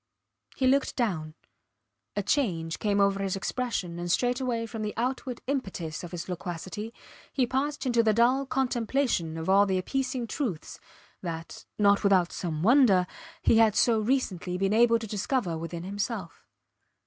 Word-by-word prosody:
He 265 - 0
looked 270 +1 +2
down. 160 - -2 0.8
A 205 - -1
change 180 - 0
came 205 -1 +1
over 200 0 +3
his 195 -1 -1
expression 195 -5 -3
and 175 0 -2
straightway 245 0 0
from 225 -1 -6
the 210 -1 -3
outward 250 +1 -2
impetus 190 - -3
of 175 - -6
his 175 -1 -6
loquacity 180 +4 -5 0.4
he 260 - +2
passed 275 +4 -2
into 240 -2 +3
the 220 -1 +3
dull 250 +5 +3
contemplation 245 - 0
of 160 - -5
all 200 +2 +5
the 190 -1 +1
appeasing 255 +5 -2
truths 225 - -4 0.4
that, 165 -2 -6
not 200 -1 +4
without 190 -4 +3
some 160 -3 -3
wonder, 220 -6 +5 0.4
he 225 - +5
had 220 -2 +5
so 230 -1 +4
recently 210 -7 -1
been 195 +2 +1
able 230 +1 +5
to 225 - -6
discover 210 -2 -1
within 165 +1 -5
himself. 200 -2 -4
210 Hz, 155 wpm, -28 LUFS, 180-250 Hz, 0.8 s, all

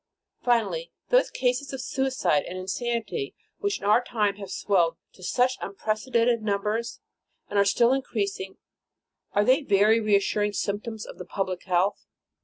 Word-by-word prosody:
Finally, 245 - +1 0.2
those - - +4
cases 255 +2 -1
of 265 - -4
suicide 260 - +1
and 185 - -6
insanity, 235 - -3 0.2
which 405 -1 0
in - - -8
our 210 +4 +5
time 210 -5 0
have 200 -2 -8
swelled 175 -4 +1 0.2
to - - -18
such 250 +7 +1
unprecedented 230 +3 0
numbers, 210 +2 -1 0.5
and 205 - +2
are 200 - +5
still 235 +4 +4
increas 220 -7 -1
ing, 190 0 -7 0.8
are 205 +1 +3
they 260 +6 +5
very 215 -2 +4
reassuring 210 -1 +2
symptoms 210 +2 -3
of - - -11
the 180 - -6
public 185 -1 -3
health? 185 +2 +1
215 Hz, 150 wpm, -26 LUFS, 200-245 Hz, 0.8 s, our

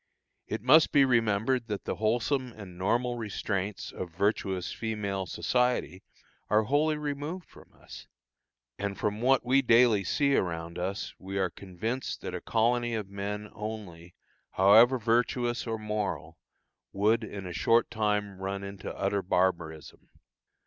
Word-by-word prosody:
It - - -4
must 150 +5 +6
be 140 -2 +6
remembered 115 0 +1
that 105 -3 -4
the - - -3
wholesome 120 +4 0
and 100 -5 -11
normal 120 +6 0
restraints 100 -2 -3
of 90 - -6
virtuous 95 0 -1
female 100 -4 -3
society 125 - 0 0.5
are 110 +1 +4
wholly 150 +6 +2
removed 150 +4 -4
from - - -17
us. - - -12 0.7
And 100 -1 -3
from 105 +1 -2
what 130 0 +3
we 135 +2 +4
daily 115 -4 +5
see 140 +8 +2
around 85 -1 -2
us 95 +3 -3
we 95 +1 -5
are 95 -2 0
convinced 110 +7 -4
that - - -5
a 90 - -4
colony 120 +1 +1
of 105 -3 -4
men 105 +1 -5
only, 100 -6 -7 0.4
however 110 +7 +6
virtuous 120 +1 0
or 115 0 -2
moral, 105 -2 -4 0.5
would 110 +4 +2
in 100 -3 -7
a 90 - -6
short 115 +7 +2
time 105 -2 -1
run 95 +1 -4
into 100 0 -7
utter 100 +1 0
barbarism. 85 -4 -1
105 Hz, 140 wpm, -29 LUFS, 95-120 Hz, 0.7 s, must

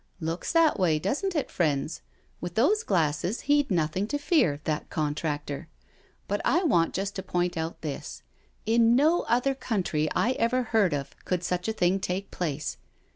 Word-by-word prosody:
" - - -39
Looks 165 +2 -3
that 330 -6 +4
way, 165 -5 +3
doesn't 295 - -1
it, 300 - -1
friends? 155 -1 0 0.4
With 175 0 -6
those 375 - +3
glasses 170 - 0
he'd 290 0 +2
nothing 175 +2 0
to 290 - -1
fear, 290 - +2
that 155 0 -2
contractor. 150 -2 -3 0.6
But 205 +1 -1
I 350 +4 +2
want 170 - +2
just 195 +1 -2
to - - -2
point 180 -1 -1
out 160 0 -4
this 150 -3 -6 0.2
— - - -38
in 235 0 +5
no 310 +6 +4
other 250 +3 +2
country 185 - -1
I 240 - +2
ever 255 0 +1
heard 220 -7 +2
of 140 -1 -5
could 180 -1 -1
such 180 +1 -2
a - - +1
thing 185 -2 +2
take 190 +1 -3
place. 155 -4 -3
185 Hz, 180 wpm, -27 LUFS, 160-245 Hz, 0.6 s, in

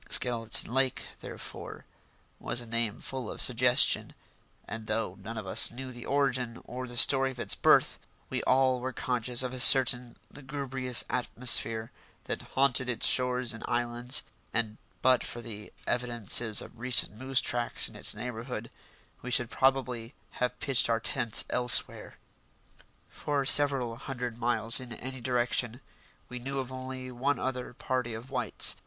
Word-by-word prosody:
Skeleton 115 -1 +3
Lake, 130 -1 +1
therefore, - - -10 0.5
was - - -1
a 120 - -4
name 115 -2 -3
full 130 -4 -5
of - - -8
suggestion, 125 0 +3 0.5
and 110 0 -8
though 105 -4 -3
none 115 +1 -8
of 110 - -6
us 95 - +7
knew 130 +2 -9
the 120 -1 -10
origin 130 -4 -1
or 130 +1 -7
the 120 0 -8
story 135 +2 +5
of 130 - -10
its - - -1
birth, - - +3 0.3
we - - -4
all 130 -1 +2
were 130 +1 -5
conscious 125 0 -1
of 130 0 -5
a 130 - -6
certain 125 -2 +6 0.2
lugubrious 135 -3 0
atmosphere 115 -2 +2 0.3
that - - -5
haunted 130 -1 0
its 120 - +1
shores 125 -2 +4
and 115 - -10
islands, 120 +1 -2 0.3
and 110 -1 -1 0.3
but 130 -1 +3
for 120 - -6
the 105 -3 -10
evidences 120 -2 0
of 115 - -15
recent 125 -2 +2
moose 130 +3 +1
tracks 120 -1 -1
in - - -10
its - - 0
neighbourhood 115 0 -7 0.5
we 125 - -7
should 125 -1 +2
probably 130 -3 -1 0.3
have 125 0 -2
pitched 135 -4 +2
our 115 -1 +1
tents 115 -1 -1
elsewhere. 125 -1 +3 0.9
For 145 -2 -3
several 135 -5 +3
hundred 125 -2 -6
miles 115 -1 +1
in 125 -2 -9
any 130 +2 -9
direction 120 -1 -2 0.5
we 125 - -8
knew 135 +3 -5
of 130 -1 -4
only 130 0 -7
one 135 +4 -1
other 125 -1 -5
party 125 -3 -3
of 120 +4 -11
whites. 125 -2 +1
125 Hz, 155 wpm, -28 LUFS, 115-130 Hz, 0.9 s, us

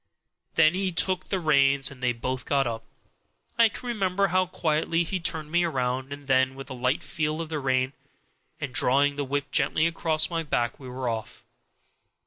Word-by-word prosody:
Then 160 0 +5
he 190 0 -1
took 185 +1 +1
the 190 - 0
reins, 140 -4 +3
and 130 -2 -13
they 125 -1 +2
both 125 +2 -4
got 140 -1 +2
up. 115 -1 -4 0.8
I 230 -1 +7
can 245 - -8
remember 200 -4 0
now - - -1
how 185 0 +3
quietly 165 0 0
he 185 +3 -3
turned 160 -2 -2
me 175 +1 +3
round, 130 -4 -2
and 145 0 -8
then 130 0 +2
with 135 0 -9
a - - -3
light 125 +2 -1
feel 155 -3 -2
of 165 -1 -4
the 155 -2 -2
rein, 130 0 0 0.7
and 135 -3 -5
drawing 140 +4 +3
the 145 - -2
whip 140 +1 -3
gently 145 +3 +2
across 165 -1 +2
my 165 -1 -1
back, 120 -6 -1
we 130 -2 -9
were 125 0 -4
off. 110 -2 -5
145 Hz, 195 wpm, -26 LUFS, 130-165 Hz, 0.8 s, I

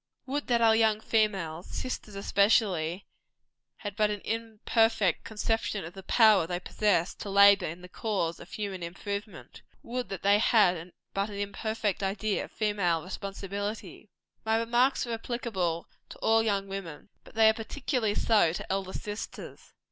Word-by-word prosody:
Would 285 +2 -3
that 235 -2 +2
our 225 -1 +6
young 220 -1 +3
females 195 -8 0
sisters 215 -5 -5
especially 195 -4 +2 0.7
had 205 -3 -6
but 210 0 +2
an 205 -1 -3
imperfect 225 -3 +1
conception 220 -3 -2
of 165 - -9
the 195 - -9
power 210 -4 +5
they 175 0 -2
possess 185 -2 +1
to 205 - -8
labor 200 -1 +6
in 170 +3 -7
the - - -9
cause 180 -4 -2
of 175 - -13
human 200 -3 -4
improvement! 200 +5 -6 0.2
Would 245 +1 -4
that 195 - -6
they 200 +1 +5
had 180 -6 +3 0.2
but 200 +2 -1
an 205 - -7
imperfect 205 0 -2
idea 200 +1 -1
of - - -17
female 195 -7 0
responsibility! 200 +2 -6 0.3
My 220 0 +2
remarks 240 +4 +2
are 235 - -4
applicable 220 -8 -2 0.2
to - - -10
all 225 0 +3
young 200 -3 0
women; 195 -4 -7
but - - -17
they 220 0 +6
are 220 - +6
particularly 225 -1 -2
so 210 -8 +3
to 180 - -5
elder 190 -1 -2
sisters. 210 +1 -7
205 Hz, 155 wpm, -29 LUFS, 190-225 Hz, 0.7 s, our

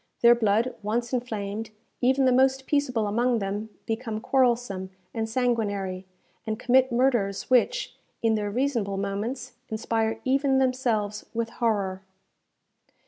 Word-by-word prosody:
Their 235 0 +9
blood 230 +1 +1
once 235 +4 -2
inflamed, 220 -3 -3 0.3
even 260 +2 +3
the 255 - +5
most 265 +1 +3
peaceable 265 -7 +1
among 235 +4 +1
them 205 +1 -3 0.2
become 225 -1 -3
quarrelsome 235 -7 +1 0.2
and 225 -1 -2
sanguinary, 205 -6 -1 0.4
and 215 0 -1
commit 255 +2 +3
murders 235 -5 +1
which, - - +2 0.3
in 225 -1 +3
their 210 -1 -1
reasonable 230 -4 -1
moments, 205 +7 -3 0.2
inspire 225 0 -1
even 270 +1 +2
themselves 240 -6 0
with 230 0 -1
horror. 200 -6 -1
230 Hz, 125 wpm, -26 LUFS, 210-255 Hz, 0.4 s, Their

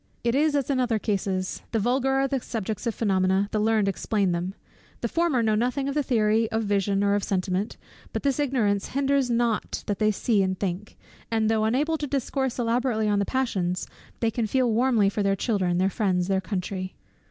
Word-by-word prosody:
It 235 0 +1
is 295 +2 +2
as 280 -1 0
in 265 - +1
other 240 -3 +1
cases; 195 -3 -2
the - - +2
vulgar 250 +5 +1
are 270 0 +2
the 270 0 -1
subjects 220 0 -4
of 230 - -1
phænomena, 190 -1 +1
the 215 - 0
learned 215 -1 +2
explain 195 0 0
them: 175 +3 -2 0.5
the - - 0
former 330 -8 +1
know 220 -1 +2
nothing 250 +5 0
of 280 - -1
the 295 - +1
theory 225 -3 +2
of 225 0 0
vision 200 -1 +1
or 200 0 +3
of 205 -1 0
sentiment; 190 +2 -1 0.3
but - - -4
this 280 0 +1
ignorance 230 -8 +1
hinders 275 -2 +2
not 235 -2 0
that 205 - -2
they 215 -1 +3
see 215 0 +1
and 190 -1 -1
think, 195 +1 -4 0.3
and 220 -1 +1
though 220 -1 +2
unable 295 +8 +1
to 295 - -2
discourse 265 -1 -1
elaborately 235 -2 0
on 205 -1 +2
the 200 - +1
passions, 190 -9 -1 0.4
they 230 -1 +2
can 225 0 -1
feel 255 +1 +2
warmly 235 -3 +3
for 205 +1 -1
their 195 -1 +2
children, 185 -4 0
their 185 +1 +3
friends, 185 -3 0
their 190 -1 +2
country. 185 -1 -4
220 Hz, 205 wpm, -25 LUFS, 195-250 Hz, 0.5 s, or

